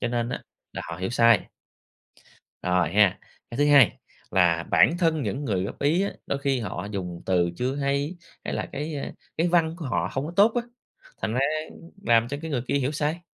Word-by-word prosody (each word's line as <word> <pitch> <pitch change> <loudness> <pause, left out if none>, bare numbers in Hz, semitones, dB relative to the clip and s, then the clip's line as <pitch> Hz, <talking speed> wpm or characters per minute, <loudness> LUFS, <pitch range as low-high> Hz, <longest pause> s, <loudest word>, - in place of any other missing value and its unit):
cho 120 - 0
nên 120 0 -1
á - - -4 0.3
là - - -5
họ - - -5
hiểu 95 +3 -3
sai. 115 -2 +4 1.1
Rồi 90 0 +1
ha, 105 -3 +4 0.3
cái 120 - -6
thứ 145 - +4
hai 140 -5 +6 0.3
là 85 -3 +3
bản 170 - +5
thân 165 -4 +2
những 130 +6 -3
người 95 -7 0
góp - - -6
ý 155 +6 +3
á, 200 - -1
đôi 140 - -1
khi 140 -3 0
họ 100 -3 -4
dùng 90 -3 -5
từ 90 -2 +2
chưa 130 +5 -1
hay, 140 +4 -1 0.3
hay - - -3
là - - -2
cái, 150 +3 -4
a, 140 - -5 0.2
cái 170 +2 +2
văn 165 -2 +2
của 170 - -7
họ 125 - 0
hông 135 +2 -2
có 165 - -6
tốt 210 +3 +6
á, 240 - +1 0.6
thành - - -1
ra, 125 - +1 0.3
ưm, 165 - -14
làm 115 - +3
cho 140 - -3
cái 160 - -5
người 130 -5 -1
kia - - 0
hiểu 140 0 +1
sai. 155 +2 -1
135 Hz, 220 wpm, -25 LUFS, 105-155 Hz, 1.1 s, hai